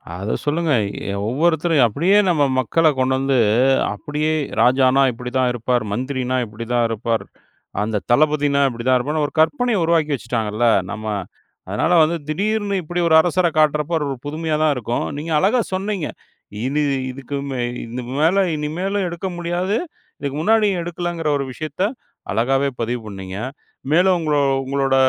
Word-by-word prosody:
அத 100 +4 -3
சொல்லுங்க. 155 0 +1 0.4
எ - - -3 0.2
ஒவ்வொருத்தரும் 160 0 +2
அப்படியே 170 - +2
நம்ம 160 -5 +3 0.2
மக்கள 160 +6 +2
கொண்டு 130 0 +2
வந்து, 135 -1 +1 0.5
அப்படியே 150 +8 -2 0.3
ராஜானா 130 +1 +4
இப்படி 125 +1 -7
தான் 130 -1 +2
இருப்பார். 120 0 0
மந்திரினா 130 +2 -2
இப்படி 110 +2 -8
தான் 120 -1 +3
இருப்பார். 115 0 -1 0.6
அந்த 105 -1 -1
தளபதினா 145 0 +3
இப்படி 120 -1 -7
தான் 130 0 +5
இருப்பார்ன்னு, 150 +4 -1
ஒரு - - -12
கற்பனைய 230 - +2
உருவாக்கி 160 -3 +2
வச்சுட்டாங்கல்ல. 115 -2 -1 0.2
நம்ம 110 -1 -6 0.6
அதனால - - +1
வந்து 165 +2 +1
திடீர்னு 200 +5 -1
இப்புடி 175 +2 -3
ஒரு 160 - +5
அரசர 175 +1 +1
காட்டுறப்போ, 150 +1 +2
ஒரு 135 - -3
புதுமையா 155 +1 -2
தான் 155 -2 +3
இருக்கும். 120 -1 -2
நீங்க 160 +3 -5
அழகா 220 +8 +3
சொன்னீங்க. 190 -3 -2 0.6
இனி 145 +3 0 0.3
இதுக்கு 140 +2 -6
மே 130 -2 -3 0.3
இது 120 +2 -6 0.2
மேல 180 +6 +4
இனிமேலு 175 +7 -2
எடுக்க 170 +2 -4
முடியாது. 175 +4 -1 0.4
இதுக்கு 140 -1 -4
முன்னாடியும் 210 -1 +3
எடுக்கலங்கிற 170 -1 -3
ஒரு 140 - -3
விஷயத்த, 155 +5 -6 0.5
அழகாவே 135 +6 +1
பதிவு 120 +1 -2
பண்ணீங்க. 95 -2 -7 0.5
மேலும் 180 +4 +4
உங்கள 155 -3 0 0.3
உங்களோட 135 0 0
145 Hz, 145 wpm, -20 LUFS, 125-170 Hz, 0.6 s, தான்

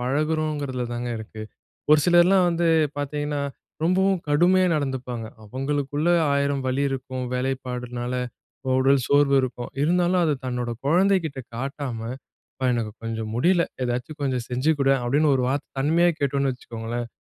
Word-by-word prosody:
பழகுறோங்குறதில 145 -1 -1
தாங்க 120 +1 -3
இருக்கு. 110 0 -8 0.5
ஒரு 150 0 +7
சிலர்லாம் 180 +1 +5
வந்து 170 0 +1 0.3
பார்த்தீங்கன்னா, 145 0 -2 0.4
ரொம்பவும் 190 +2 +2
கடுமையா 180 +5 +4
நடந்துப்பாங்க. 130 -5 -3 0.2
அவங்களுக்குள்ள 145 +6 -1 0.2
ஆயிரம் 140 -1 0
வலி 130 +2 0
இருக்கும் 130 -1 -4
வேலைப்பாடுனால. 125 -1 -3 0.7
உடல் 135 0 +4
சோர்வு 145 -1 +3
இருக்கும் 125 -1 -4
இருந்தாலும் 175 +3 +2
அத 155 - +2
தன்னோட 125 -1 -2 0.2
குழந்தைகிட்ட 175 -2 +2 0.2
காட்டாம 135 -2 -4 0.6
"அப்பா, 130 - -5
எனக்கு 115 -3 -2
கொஞ்சம் 110 -1 -4
முடில 170 +8 +3 0.2
ஏதாவது 125 +4 -2
கொஞ்சம் 130 -4 -1
செஞ்சுக்குடேன்" 135 +1 +2
அப்டின் 145 +5 +3
ஒரு 130 - +1
வார்த்த 140 +1 -3
தன்மையா 165 +6 +3
கேட்டோன்னு 140 -1 +1
வச்சுக்கோங்களேன். 120 -1 -5
140 Hz, 125 wpm, -24 LUFS, 125-155 Hz, 0.7 s, ஒரு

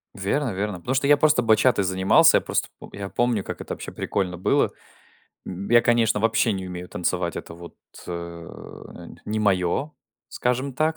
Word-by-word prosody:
Верно-верно. 100 -3 -2
Потому 125 +9 -3
что 135 +1 +1
я 145 - +7
просто 150 -4 +3
батчатой 110 -2 +3
занимался, 95 0 +5
я - - 0
просто - - -1
пом - - -11
я 100 -1 -5
помню, 120 -5 0
как - - -6
это - - -5
вообще - - -8
прикольно 90 -3 -2
было. 90 - +1 0.8
М, 95 +2 -6
я, 120 0 +7
конечно, 115 -3 +2
вообще 115 0 +2
не 95 -1 -4
умею 90 0 -7
танцевать, 90 0 -2
это 85 - -7
вот, 85 0 -12 0.3
э, 90 - -5 0.9
нь - - -13
не 110 +1 -2
моё, 100 - 0 0.4
скажем 130 +3 -2
так. 155 +2 0
105 Hz, 175 wpm, -24 LUFS, 95-125 Hz, 0.9 s, я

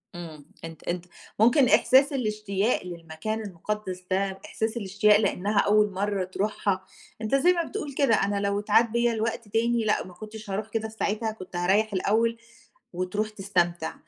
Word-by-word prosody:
إمم 160 -4 -9 0.2
أنت 160 -2 -10
أنت 175 0 -3 0.3
مُمكن 250 +4 +5
إحساس 275 +3 +5
الإشتياق 215 -3 0
للمكان 175 +5 -5
المُقدّس 190 -1 -5
ده، 190 0 0
إحساس 220 +1 -2
الإشتياق 205 0 +3
لأنها 200 0 +1
أول 210 0 +3
مرة 200 0 -1
تروحها، 190 0 -2 0.4
أنت 220 +5 +1
زي 350 +7 +5
ما 340 -1 0
بتقول 320 -7 -5
كده 265 -6 +3
"أنا 200 0 0
لو 200 0 0
إتعاد 220 +2 +3
بّيا 235 0 +2
الوقت 225 0 -2
تاني 230 +2 +1
لأ، 215 - +1
ما 180 - -12
كُنتش 215 +2 -10
هاروح 205 +3 -3
كده 220 0 -2
في 220 - -14
ساعتها، 220 +2 0
كنت 185 -4 -11
هاريِّح 195 +4 +2
الأول." 225 +5 +1 0.6
وتروح 185 +4 -2
تستمتع، 175 -5 -1
210 Hz, 160 wpm, -26 LUFS, 190-225 Hz, 0.6 s, مُمكن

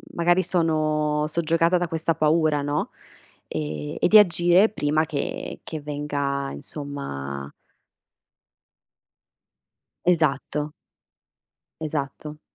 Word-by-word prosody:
magari 175 +2 +3
sono 155 -3 +1
soggiogata 165 +2 +2
da 175 0 -1
questa 165 0 -1
paura, 155 -1 +2
no, 145 +1 -1 0.6
e 75 -1 -4
e - - +3
di 215 - +8
agire 180 +1 +5
prima 155 -5 +1
che 145 -2 -4
che 155 -2 -5
venga, 145 -1 -2
insomma 105 - -6 2.5
Esatto. 150 -3 +1 1.1
Esatto. 150 0 -4
150 Hz, 85 wpm, -24 LUFS, 145-165 Hz, 2.5 s, di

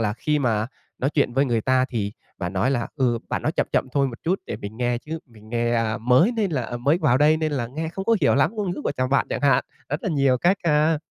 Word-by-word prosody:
là 105 -2 +1
khi 150 +6 0
mà 115 -5 +1 0.3
nói 135 +3 0
chuyện 145 -5 +1
với 135 +1 +3
người 120 -4 0
ta 130 +2 +2
thì 105 -6 -3 0.3
bạn 90 +1 -3
nói 100 +8 +1
là 120 -4 -1
"Ừ, 120 -4 +1
bạn - - -2
nói - - 0
chậm - - 0
chậm - - +1
thôi 140 -1 +2
một 120 - -10
chút 180 +4 0
để 105 - -4
mình 105 0 -8
nghe, 120 0 0
chứ 160 +5 -6
mình 110 -3 -17
nghe, 120 0 0
a, 115 0 0
mới 130 - +4
nên 215 -5 0
là 120 -6 -2
mới 140 +8 +2
vào 135 -6 +3
đây 155 +2 +5
nên 155 -1 -1
là 130 -5 -1
nghe 155 +6 -4
không 190 +4 -5
có 230 -1 +3
hiểu - - +4
lắm 140 -1 +3
ngôn 205 -4 -2
ngữ - - -4
của - - 0
chồng 130 0 -1
bạn" 140 - +2
chẳng - - -2
hạn, 140 -2 +3 0.2
rất 145 +4 -3
là - - -1
nhiều 135 -5 +2
cách 180 +8 +3
ha. 155 0 +3
130 Hz, 280 wpm, -23 LUFS, 120-155 Hz, 0.3 s, đây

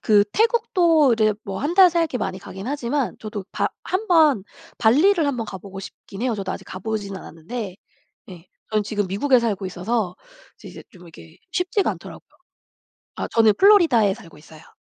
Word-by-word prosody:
그 205 -2 +4
태국도 350 - +3
이제 215 -2 +2
뭐 195 -2 -5
1 305 +5 -2
달 370 -2 +7
살기 330 -6 0
많이 185 - -3
가긴 195 +3 -9
하지만 275 -1 -2
저도 210 -3 -6
바 - - 0 0.2
1 405 +4 -2
번 310 - +4 0.4
발리를 310 - +4
1 280 -3 -1
번 230 - -3
가 190 -3 -7
보고 195 0 -9
싶긴 195 +2 -10
해요. 250 -3 0
저도 195 -2 -4
아직 - - -6
가 185 - -8
보진 205 -1 -4
않았는데 190 +4 -7 0.5
예. 175 -1 -12 0.2
저는 215 -1 +1
지금 205 -2 -2
미국에 250 +8 +2
살고 205 -5 -2
있어서 185 +1 -2 0.4
이제, - - -12
이제 - - -11
좀 180 -2 -16
이게 80 - -15 0.2
쉽지가 370 +2 0
않더라고요. - - -10 0.9
아 - - -4
저는 220 -2 +4
플로리다에 325 - +5
살고 165 -5 -15
있어요. 155 0 -17
220 Hz, 340 characters per minute, -22 LUFS, 195-295 Hz, 0.9 s, 달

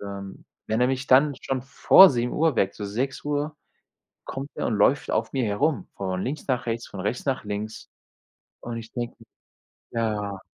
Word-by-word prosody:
Ähm, 100 -1 -8 0.2
wenn 110 +2 0
er 125 - +5
mich 130 +1 -2
dann 140 +2 +5
schon 135 -1 -2
vor 140 +8 +7
7:00 135 +4 +1
weckt 100 -4 +1
so 105 - -5
6:00 145 +7 -2 0.7
kommt 135 +2 -6
er - - -2
und 110 - 0
läuft 115 +7 +3
auf 110 +4 -1
mir 130 -2 +1
herum, 110 - 0
von 95 -1 -3
links 140 +3 -4
nach 125 -3 -1
rechts, 115 0 -2
von 95 - -9
rechts 105 +6 -2
nach 135 -4 -1
links, 105 +1 -5 0.7
und 120 -1 -6
ich 115 0 -8
denke 120 -1 -4 0.7
mir: 115 - -1
„Ja." 105 -3 -2
120 Hz, 175 wpm, -25 LUFS, 105-135 Hz, 0.7 s, vor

